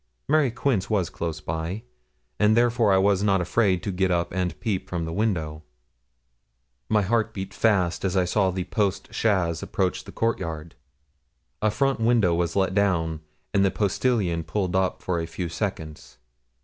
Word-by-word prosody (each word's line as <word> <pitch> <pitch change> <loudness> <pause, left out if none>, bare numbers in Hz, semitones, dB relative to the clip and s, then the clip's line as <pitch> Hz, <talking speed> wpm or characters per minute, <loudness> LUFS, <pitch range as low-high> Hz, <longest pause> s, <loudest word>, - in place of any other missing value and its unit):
Mary 150 -2 +3
Quince 115 -3 -1
was 100 -6 0
close 80 -2 -4
by, 80 +8 -4 0.6
and 105 +2 +4
therefore 120 -3 +3
I 95 - +5
was 95 0 +3
not 100 -2 +3
afraid 90 0 +1
to 100 - -2
get 95 0 +1
up 85 -1 0
and 90 -1 -2
peep 105 -5 -2
from 85 -2 -2
the 80 - -5
window. 80 -7 -1 1.3
My 105 -1 +3
heart 110 +2 0
beat 95 -1 -5
fast 95 -6 +1
as 95 -1 0
I 90 - +3
saw 95 +1 +2
a 90 0 -2
post 100 0 -2
chaise 90 -7 +1
approach 95 -2 -1
the - - -9
court 115 0 0
yard. 80 -1 -6 0.9
A 110 - +3
front 135 +4 0
window 115 -6 +3
was 85 0 -1
let 95 -1 +1
down, 85 -6 +1 0.3
and 100 -1 +4
the 100 - +4
postilion 100 -4 0
pulled 90 +3 -2
up 95 0 0
for 90 -2 -1
a 80 - -3
few 85 +1 -4
seconds. 80 - -5
95 Hz, 175 wpm, -25 LUFS, 85-105 Hz, 1.3 s, I